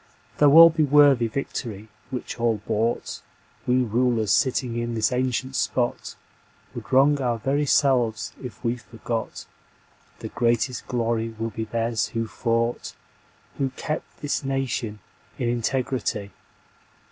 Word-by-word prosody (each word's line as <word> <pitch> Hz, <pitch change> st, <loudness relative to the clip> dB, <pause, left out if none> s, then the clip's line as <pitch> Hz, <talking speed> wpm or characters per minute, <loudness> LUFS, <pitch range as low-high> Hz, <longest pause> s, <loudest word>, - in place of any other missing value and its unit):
Though 145 Hz, -1 st, +6 dB
all 165 Hz, +1 st, +10 dB
be 160 Hz, 0 st, -1 dB
worthy 145 Hz, -4 st, +5 dB
Victory 110 Hz, -3 st, -5 dB, 0.2 s
which 125 Hz, -2 st, -6 dB
all 115 Hz, -2 st, +2 dB
bought, 115 Hz, +2 st, -1 dB, 0.5 s
We 125 Hz, +1 st, +3 dB
rulers 115 Hz, -2 st, +1 dB
sitting 125 Hz, +1 st, +1 dB
in 120 Hz, 0 st, -2 dB
this 110 Hz, +1 st, +1 dB
ancient 130 Hz, +1 st, -1 dB
spot 120 Hz, -1 st, -1 dB, 0.6 s
Would -, -, -9 dB
wrong 140 Hz, +2 st, +4 dB
our 120 Hz, -2 st, 0 dB
very 140 Hz, +5 st, 0 dB
selves 125 Hz, -6 st, +2 dB
if 125 Hz, 0 st, -9 dB
we 120 Hz, 0 st, 0 dB
forgot 115 Hz, -1 st, -5 dB, 0.7 s
The -, -, -7 dB
greatest 120 Hz, +1 st, 0 dB
glory 115 Hz, -2 st, -1 dB
will 115 Hz, +1 st, -3 dB
be 110 Hz, +1 st, -4 dB
theirs 115 Hz, 0 st, -1 dB
who 115 Hz, -, 0 dB
fought, 115 Hz, +1 st, -2 dB, 0.6 s
Who 135 Hz, -1 st, +1 dB
kept 155 Hz, 0 st, -5 dB
this 145 Hz, -1 st, -2 dB
nation 130 Hz, -5 st, -2 dB, 0.4 s
in 125 Hz, -, -1 dB
integrity." 120 Hz, -4 st, -2 dB
120 Hz, 130 wpm, -24 LUFS, 115-135 Hz, 0.7 s, all